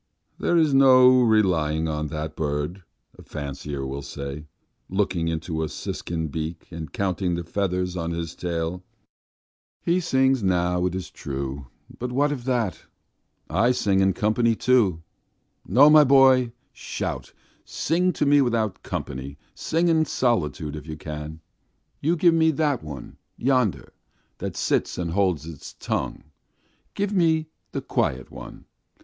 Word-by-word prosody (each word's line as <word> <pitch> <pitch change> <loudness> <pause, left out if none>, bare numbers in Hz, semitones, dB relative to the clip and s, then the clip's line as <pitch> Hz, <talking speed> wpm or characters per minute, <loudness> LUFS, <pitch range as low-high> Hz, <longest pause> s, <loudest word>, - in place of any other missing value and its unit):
"There 175 - +2
is 155 -4 +3
no 130 -1 +7
relying 85 -9 +2
on 75 -1 -2
that 75 0 -5
bird," 75 +5 -2 0.4
a - - -9
fancier 70 -1 -5
will 70 +1 -4
say, 70 +2 -7 0.4
looking 90 -3 0
into 80 0 -2
a 80 - -2
siskin's 80 -3 -4
beak, 80 +2 -5
and 80 -3 -7
counting 95 -2 -1
the 85 - -3
feathers 90 0 -2
on 85 -1 -2
its 85 -1 -4
tail. 85 +1 -3 1.0
"He 175 +2 +3
sings 130 -6 +2
now, 90 -1 +1
it's 90 +1 -5
true, 70 -1 -5 0.3
but 125 +1 -3
what 145 +3 +2
of 130 -4 -5
that? 120 - 0 0.7
I 115 +5 +2
sing 100 -5 +1
in 95 0 +3
company 110 +3 +2
too. 105 -10 +2 0.6
No, 130 +10 +6
my 150 0 +8
boy, 130 -3 +5 0.2
shout, - - -5 0.3
sing 180 +4 0
to - - 0
me 145 0 +5
without 115 -6 0
company; 70 +2 -5 0.2
sing 165 +2 0
in 160 -1 +3
solitude, 80 - -1
if 75 0 -9
you 80 -1 -6
can.... 75 +1 -7 0.6
You 165 +4 +1
give 170 0 +4
me 160 -1 +4
that 150 -4 0
one 70 -5 -9 0.2
yonder 125 -5 0 0.5
that - - -5
sits - - 0
and 85 -2 -2
holds 90 -5 +1
its 80 -4 -9
tongue! - - -3 0.7
Give 205 0 -1
me 160 -4 +2 0.2
the - - -3
quiet 65 0 -1
one! - - -10
95 Hz, 145 wpm, -24 LUFS, 80-130 Hz, 1.0 s, my